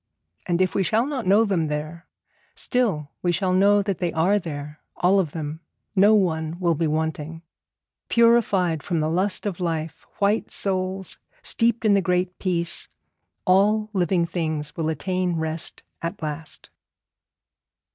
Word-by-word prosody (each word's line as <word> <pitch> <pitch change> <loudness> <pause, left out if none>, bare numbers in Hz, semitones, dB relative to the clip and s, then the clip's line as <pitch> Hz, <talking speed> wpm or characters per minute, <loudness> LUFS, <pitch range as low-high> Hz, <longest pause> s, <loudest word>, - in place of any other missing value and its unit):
And 175 +1 +2
if 185 - -1
we 195 - +1
shall 220 +5 +2
not 270 -7 -3
know 205 +4 +5
them 180 -6 0
there, 155 +3 -5 0.5
still 195 - -1
we 175 - +1
shall 185 +1 0
know 200 +2 +4
that 195 -3 -2
they 175 -2 0
are 185 +6 +3
there, 150 -3 -7 0.2
all 190 +3 +3
of 170 -6 0
them 155 0 -5 0.4
not 205 +3 +6
one 165 -4 +1
will 170 -2 +2
be 165 +1 0
wanting. 160 +1 -3 0.7
Purified 205 -9 +3
from 165 +4 -1
the 155 +1 0
lust 185 +4 0
of 195 -4 -3
life, 165 -3 -3
white 205 +2 +1
souls 190 -1 -3 0.2
steeped 230 0 0
in 210 - +5
the 200 - +4
Great 180 -1 -1
Peace, 170 -3 -2 0.6
all 210 +3 +3
living 180 -2 +2
things 155 -3 -3
will 160 -1 -1
attain 180 +2 -1
rest 160 0 -3 0.2
at 170 +4 -4
last. 155 +1 -6
180 Hz, 150 wpm, -24 LUFS, 160-200 Hz, 0.7 s, not